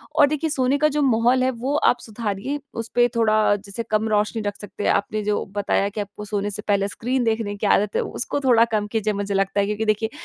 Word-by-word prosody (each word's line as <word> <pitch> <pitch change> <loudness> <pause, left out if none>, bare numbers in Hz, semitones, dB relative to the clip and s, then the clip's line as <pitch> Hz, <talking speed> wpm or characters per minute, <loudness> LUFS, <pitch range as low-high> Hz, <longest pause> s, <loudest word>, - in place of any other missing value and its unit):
और 290 - +6
देखिए 305 +2 -1
सोने 265 -1 +1
का 305 +1 +3
जो 300 - +1
माहौल 250 -1 +3
है 260 - +2
वो 260 +4 -3
आप 245 - +3
सुधारिए। 220 +4 -4 0.2
उसपे 240 +2 +2
थोड़ा 215 -2 +3
जैसे 200 +2 -6
कम 215 +1 +1
रोशनी 215 +1 0
रख 205 -1 -3
सकते 205 0 -7
है। - - +2
आपने 215 +1 0
जो 210 0 0
बताया 200 -1 +1
कि 210 +1 -4
आपको 205 +1 -8
सोने 205 -1 -2
से 210 - -5
पहले 200 -1 +2
स्क्रीन 245 +5 -2
देखने 220 -3 -1
की 205 +1 -2
आदत 205 +1 +2
है, - - +2
उसको 285 - -3
थोड़ा 245 -4 +4
कम 210 -1 +1
कीजिए 215 0 -1
मुझे 200 0 -3
लगता 195 +1 0
है 200 - +3
क्योंकि 210 +2 -2
देखिए 215 +1 +1
215 Hz, 235 wpm, -22 LUFS, 205-245 Hz, 0.2 s, और